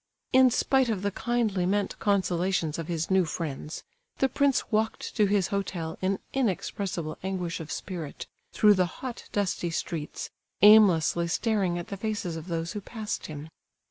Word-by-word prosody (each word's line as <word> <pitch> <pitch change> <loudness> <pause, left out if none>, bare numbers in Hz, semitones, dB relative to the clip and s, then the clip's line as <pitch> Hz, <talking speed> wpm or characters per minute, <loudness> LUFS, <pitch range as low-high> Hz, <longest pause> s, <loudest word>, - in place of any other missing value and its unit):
In 260 0 +7
spite 260 +1 +2
of 205 -4 -1
the 200 - 0
kindly 215 -5 0
meant 200 0 0
consolations 180 -5 +1
of 165 - -4
his 165 0 -2
new 190 -1 +5
friends, 155 -2 -5 0.3
the 270 - +3
prince 275 0 +1
walked 220 +1 -1
to 210 -3 +4
his 195 -2 +1
hotel 175 -5 -3
in 190 +1 +1 0.2
inexpressible 195 - -2
anguish 185 -2 -3
of 160 -1 -7
spirit, 170 -6 -5 0.3
through 210 -1 +5
the 185 -2 +2
hot, 255 -2 -7
dusty 190 -3 -1
streets, 160 -1 -4 0.3
aimlessly 185 -6 +6
staring 195 -1 0
at 175 - -6
the 200 - -5
faces 205 -4 -3
of 160 +1 -7
those 165 -1 -2
who 210 - -5
passed 215 0 -5
him. 150 0 -8
190 Hz, 160 wpm, -27 LUFS, 170-215 Hz, 0.3 s, In